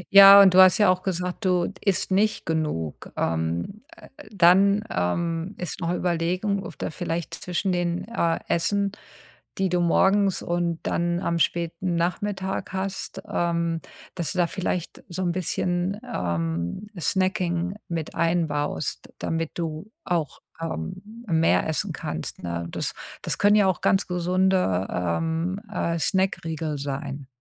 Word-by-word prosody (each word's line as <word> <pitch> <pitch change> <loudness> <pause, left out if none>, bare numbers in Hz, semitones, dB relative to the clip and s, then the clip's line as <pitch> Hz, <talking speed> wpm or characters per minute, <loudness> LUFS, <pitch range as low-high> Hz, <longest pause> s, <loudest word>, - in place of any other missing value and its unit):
Ja, 200 0 +12
und 190 -2 +7
du 185 - +6
hast 185 -1 +7
ja 205 -3 +5
auch 185 - -1
gesagt, 180 +2 -3
du 180 0 +1
isst 195 -1 +1
nicht 210 +3 +1
genug. 150 - -2
Ähm, 85 - -2 0.2
äh - - -14
äh 240 - -15
dann, 200 +2 +5
ähm, 165 - -1
ist 180 +1 -5
noch 170 0 0
Überlegung, 180 +3 0
ob - - -9
da - - -3
vielleicht 170 0 -4
zwischen 180 +2 -2
den, 175 -1 -1
äh, 170 -8 0
Essen, 200 +4 +1 0.7
die 190 -1 +1
du 180 0 +1
morgens 195 +3 +3
und 170 -1 -1
dann 175 0 0
am 170 -2 -1
späten 170 +2 0
Nachmittag 190 +3 -2
hast, 190 0 -4
ähm, 170 -1 0 0.3
dass 170 -2 -2
du - - -7
da 175 - +5
vielleicht 180 -2 -3
so 185 +1 -3
'n 175 - +1
bisschen, 180 +2 -1
ähm, 85 - -2
Snacking 180 -1 0
mit 165 -3 -4
einbaust, 160 -4 -1
damit 165 -1 -2
du 165 +4 -4
auch, 165 -5 -2 0.2
ähm, 165 - -6
mehr 165 -2 +3
essen 160 - -1
kannst, - - -5
ne? 85 -1 -3
Das - - -3 0.3
das - - -2
können 205 +1 +5
ja 210 -2 +5
auch 185 - 0
ganz 195 +1 +3
gesunde, 180 - +1
ähm, 160 - -1
äh, 170 -5 -1
Snackriegel 165 -4 -1
sein. 140 0 -5
175 Hz, 145 wpm, -25 LUFS, 165-190 Hz, 0.7 s, Ja